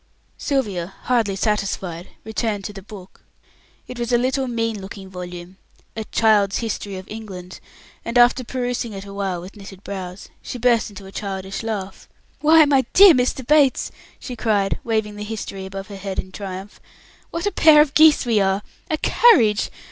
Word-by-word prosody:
Sylvia, 200 Hz, -, -2 dB
hardly 230 Hz, -6 st, +1 dB
satisfied, 190 Hz, -4 st, -2 dB, 0.2 s
returned 220 Hz, -2 st, -2 dB
to 205 Hz, -, -5 dB
the 195 Hz, -, -9 dB
book. 195 Hz, -1 st, -13 dB, 0.7 s
It 250 Hz, -, -8 dB
was 235 Hz, 0 st, -2 dB
a 240 Hz, -, +5 dB
little 260 Hz, +2 st, 0 dB
mean 230 Hz, -3 st, -2 dB
looking 190 Hz, 0 st, -9 dB
volume 180 Hz, 0 st, -8 dB, 0.4 s
a 220 Hz, 0 st, -4 dB
"Child's 210 Hz, -3 st, +2 dB
History 210 Hz, -3 st, -4 dB
of 185 Hz, -, -9 dB
England" 190 Hz, -5 st, -9 dB, 0.4 s
and 235 Hz, +1 st, -2 dB
after 245 Hz, +1 st, +5 dB
perusing 245 Hz, -2 st, -3 dB
it 195 Hz, 0 st, -7 dB
awhile 200 Hz, -2 st, -3 dB
with 185 Hz, +5 st, -11 dB
knitted 195 Hz, -1 st, -12 dB
brows, 190 Hz, -1 st, -7 dB
she -, -, -6 dB
burst 235 Hz, -1 st, +2 dB
into 200 Hz, -1 st, -11 dB
a 190 Hz, -, -11 dB
childish 195 Hz, -1 st, -5 dB
laugh. 205 Hz, -4 st, -5 dB, 0.3 s
"Why, 315 Hz, +1 st, +6 dB
my 275 Hz, -3 st, +3 dB
dear 390 Hz, -2 st, +9 dB
Mr. 255 Hz, 0 st, 0 dB
Bates!" 285 Hz, -1 st, +3 dB, 0.3 s
she 250 Hz, -, -7 dB
cried, 210 Hz, -4 st, 0 dB
waving 220 Hz, -2 st, -1 dB
the 210 Hz, -, -5 dB
History 200 Hz, -3 st, -6 dB
above 195 Hz, 0 st, -7 dB
her 200 Hz, -, -8 dB
head 195 Hz, 0 st, -5 dB
in 185 Hz, -, -4 dB
triumph, 195 Hz, 0 st, -8 dB, 0.5 s
"what 335 Hz, +2 st, -4 dB
a 410 Hz, -, +1 dB
pair 315 Hz, -5 st, +6 dB
of 300 Hz, -2 st, +4 dB
geese 310 Hz, -3 st, +6 dB
we 230 Hz, -3 st, +2 dB
are! 195 Hz, +1 st, +1 dB, 0.3 s
A 310 Hz, -, 0 dB
carriage! 235 Hz, -, +4 dB
210 Hz, 170 wpm, -21 LUFS, 195-245 Hz, 0.7 s, dear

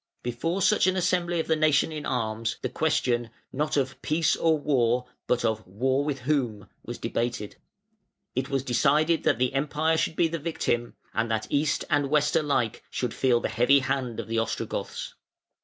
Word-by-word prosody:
Before 165 Hz, +10 st, -1 dB
such 210 Hz, 0 st, +4 dB
an 185 Hz, -, +2 dB
assembly 175 Hz, -1 st, +1 dB
of 160 Hz, -, 0 dB
the 160 Hz, -, +2 dB
nation 155 Hz, 0 st, +3 dB
in 150 Hz, -1 st, -5 dB
arms, 115 Hz, -2 st, -2 dB
the -, -, -1 dB
question, 130 Hz, -7 st, 0 dB, 0.2 s
not 150 Hz, +2 st, -1 dB
of 130 Hz, -1 st, -1 dB
Peace 160 Hz, +2 st, +2 dB
or 160 Hz, -1 st, +2 dB
War? 125 Hz, -4 st, +1 dB, 0.2 s
but 125 Hz, 0 st, +1 dB
of 110 Hz, -1 st, 0 dB
War 130 Hz, +8 st, 0 dB
with 140 Hz, -2 st, -3 dB
whom? 125 Hz, -7 st, -1 dB, 0.2 s
was -, -, -6 dB
debated. 115 Hz, -3 st, -3 dB, 0.8 s
It 130 Hz, +2 st, -2 dB
was 135 Hz, -2 st, 0 dB
decided 150 Hz, +6 st, +2 dB
that -, -, +3 dB
the 125 Hz, +2 st, +1 dB
Empire 150 Hz, +3 st, +1 dB
should 160 Hz, -, 0 dB
be 170 Hz, -, +3 dB
the 165 Hz, 0 st, -4 dB
victim, 120 Hz, -7 st, -2 dB, 0.2 s
and 115 Hz, +1 st, 0 dB
that 110 Hz, -1 st, -1 dB
East 145 Hz, 0 st, +1 dB
and 145 Hz, -1 st, +1 dB
West 150 Hz, +1 st, +2 dB
alike 140 Hz, -8 st, 0 dB
should 125 Hz, -3 st, -2 dB
feel 120 Hz, -2 st, +2 dB
the -, -, 0 dB
heavy 120 Hz, +6 st, +4 dB
hand 130 Hz, -3 st, -2 dB
of -, -, -5 dB
the 115 Hz, 0 st, 0 dB
Ostrogoths. 115 Hz, -, -3 dB
135 Hz, 180 wpm, -27 LUFS, 120-155 Hz, 0.8 s, such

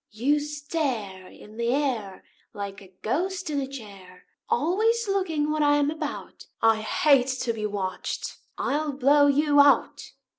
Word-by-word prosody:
You 265 Hz, +8 st, +1 dB
stare 285 Hz, -, -4 dB
In 215 Hz, +3 st, -15 dB
the 235 Hz, 0 st, -1 dB
air 245 Hz, -9 st, -2 dB, 0.3 s
Like 200 Hz, -1 st, -6 dB
a 190 Hz, -1 st, -15 dB
ghost 360 Hz, -, -2 dB
in 285 Hz, -1 st, 0 dB
a 265 Hz, -, -3 dB
chair, 200 Hz, -8 st, -11 dB, 0.2 s
Always 435 Hz, -, +1 dB
looking 330 Hz, -7 st, 0 dB
what 305 Hz, 0 st, 0 dB
I 290 Hz, 0 st, +4 dB
am 290 Hz, 0 st, +2 dB
about; 315 Hz, -, -6 dB
I 225 Hz, -1 st, +4 dB
hate 255 Hz, +4 st, +3 dB
to 230 Hz, -, -1 dB
be 215 Hz, -1 st, -3 dB
watched 190 Hz, -3 st, -4 dB, 0.2 s
I'll 295 Hz, +1 st, -1 dB
blow 285 Hz, +2 st, +4 dB
you 290 Hz, +1 st, +3 dB
out." 285 Hz, 0 st, +3 dB
280 Hz, 150 wpm, -25 LUFS, 215-300 Hz, 0.3 s, I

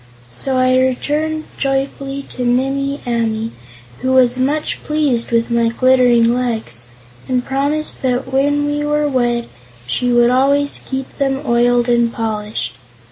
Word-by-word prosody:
So 260 Hz, -, -1 dB
I 255 Hz, 0 st, +3 dB
returned 300 Hz, +5 st, 0 dB, 0.2 s
joyfully 275 Hz, 0 st, -2 dB
to 250 Hz, -, -4 dB
Nimmie 270 Hz, +3 st, 0 dB
Amee, 230 Hz, -2 st, -1 dB, 0.5 s
who 260 Hz, 0 st, 0 dB
was 255 Hz, -1 st, +4 dB
much 295 Hz, +4 st, -1 dB
pleased 295 Hz, -6 st, 0 dB
with 230 Hz, 0 st, +1 dB
my 235 Hz, -1 st, +2 dB
glittering 245 Hz, -1 st, +4 dB
legs 230 Hz, -, -2 dB, 0.5 s
and 250 Hz, -1 st, 0 dB
promised 285 Hz, +3 st, -1 dB
that 260 Hz, 0 st, -1 dB
when 290 Hz, +2 st, +2 dB
we 290 Hz, 0 st, -1 dB
were 295 Hz, 0 st, +1 dB
wed 240 Hz, -3 st, 0 dB, 0.4 s
she 245 Hz, -, 0 dB
would 240 Hz, 0 st, +4 dB
always 280 Hz, +3 st, +2 dB
keep 265 Hz, 0 st, -6 dB
them 270 Hz, 0 st, 0 dB
oiled 240 Hz, 0 st, +2 dB
and 235 Hz, -1 st, +2 dB
polished. 210 Hz, -, -3 dB
255 Hz, 135 wpm, -17 LUFS, 235-275 Hz, 0.5 s, was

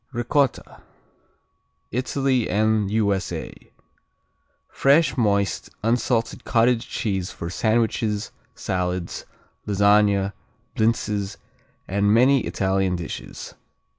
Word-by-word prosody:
Ricotta 130 Hz, +2 st, -1 dB, 1.1 s
Italy 130 Hz, 0 st, 0 dB
and 110 Hz, +1 st, +1 dB
U.S.A. 100 Hz, -3 st, -1 dB, 1.1 s
Fresh, 145 Hz, +4 st, +3 dB
moist, 100 Hz, -, 0 dB
unsalted 115 Hz, 0 st, 0 dB
cottage 115 Hz, 0 st, +2 dB
cheese 95 Hz, -4 st, -2 dB
for 85 Hz, 0 st, -6 dB
sandwiches, 110 Hz, -1 st, 0 dB, 0.2 s
salads, 90 Hz, -1 st, -3 dB, 0.4 s
lasagne, 100 Hz, -1 st, +3 dB, 0.4 s
blintzes 105 Hz, -3 st, 0 dB, 0.5 s
and 100 Hz, +2 st, +1 dB
many 130 Hz, +5 st, +5 dB
Italian 95 Hz, -1 st, 0 dB
dishes. 85 Hz, -2 st, -7 dB
105 Hz, 75 wpm, -23 LUFS, 100-120 Hz, 1.1 s, many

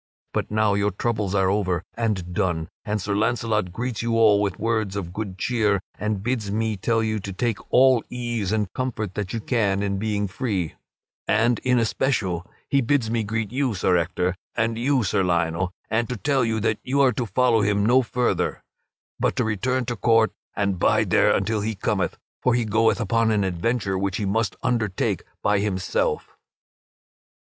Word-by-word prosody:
But -, -, -1 dB
now 105 Hz, -1 st, +2 dB
your 100 Hz, +1 st, +2 dB
troubles 105 Hz, -1 st, -1 dB
are 95 Hz, -1 st, +3 dB
over 95 Hz, -4 st, 0 dB
and 105 Hz, -6 st, -2 dB
done, 85 Hz, -5 st, -1 dB
and 105 Hz, -1 st, -1 dB
Sir 100 Hz, +1 st, -2 dB
Launcelot 110 Hz, -2 st, 0 dB
greets 120 Hz, +3 st, -3 dB
you 115 Hz, -1 st, 0 dB
all 105 Hz, -3 st, +5 dB
with 100 Hz, -3 st, -1 dB
words 110 Hz, -3 st, -1 dB
of 90 Hz, -4 st, -4 dB
good 100 Hz, -2 st, -5 dB
cheer 105 Hz, -2 st, +1 dB, 0.2 s
and 105 Hz, -2 st, -2 dB
bids 115 Hz, -3 st, -1 dB
me 110 Hz, +1 st, 0 dB
tell 115 Hz, +3 st, 0 dB
you 110 Hz, -1 st, -1 dB
to 100 Hz, 0 st, -6 dB
take 115 Hz, +3 st, -1 dB
all 130 Hz, -2 st, +5 dB
ease 120 Hz, -5 st, -2 dB
and 105 Hz, -3 st, -1 dB
comfort 110 Hz, -6 st, -3 dB
that 100 Hz, -2 st, -4 dB
you 115 Hz, -, -2 dB
can 105 Hz, -4 st, 0 dB
in 100 Hz, -1 st, -1 dB
being 105 Hz, -1 st, -1 dB
free, 95 Hz, -, -2 dB, 0.5 s
and 115 Hz, +1 st, +3 dB
in 125 Hz, -1 st, +2 dB
especial 110 Hz, -7 st, 0 dB, 0.2 s
he 140 Hz, -, +2 dB
bids 120 Hz, -3 st, +1 dB
me 115 Hz, -1 st, +1 dB
greet 110 Hz, 0 st, -2 dB
you, 130 Hz, -3 st, 0 dB
Sir 95 Hz, -1 st, +2 dB
Ector, 90 Hz, +1 st, 0 dB, 0.2 s
and 115 Hz, 0 st, 0 dB
you, 130 Hz, +2 st, +1 dB
Sir 95 Hz, -, +1 dB
Lionel, 85 Hz, +1 st, 0 dB, 0.2 s
and 115 Hz, +1 st, 0 dB
to 125 Hz, -, -3 dB
tell 135 Hz, +3 st, +1 dB
you 110 Hz, -1 st, 0 dB
that 110 Hz, 0 st, 0 dB
you 135 Hz, +2 st, -1 dB
are 130 Hz, -2 st, +4 dB
to 120 Hz, +1 st, -2 dB
follow 115 Hz, +2 st, +3 dB
him 100 Hz, 0 st, +2 dB
no 125 Hz, +3 st, +5 dB
farther, 125 Hz, 0 st, -1 dB, 0.6 s
but -, -, +1 dB
to -, -, +1 dB
return 125 Hz, +4 st, 0 dB
to 120 Hz, 0 st, -2 dB
court 115 Hz, +1 st, +3 dB, 0.2 s
and 100 Hz, -3 st, 0 dB
bide -, -, +2 dB
there -, -, +5 dB
until 105 Hz, +2 st, +1 dB
he 110 Hz, +1 st, -2 dB
cometh; -, -, -1 dB, 0.2 s
for 125 Hz, -2 st, +3 dB
he 120 Hz, -1 st, +1 dB
goeth 110 Hz, +1 st, +2 dB
upon 115 Hz, +1 st, +2 dB
an 105 Hz, -2 st, +2 dB
adventure 95 Hz, +2 st, -1 dB
which 95 Hz, -1 st, -1 dB
he 105 Hz, -, -2 dB
must 100 Hz, 0 st, 0 dB
undertake 110 Hz, -6 st, 0 dB, 0.2 s
by 105 Hz, -1 st, +3 dB
himself." 95 Hz, -3 st, -1 dB
110 Hz, 185 wpm, -24 LUFS, 100-115 Hz, 0.6 s, all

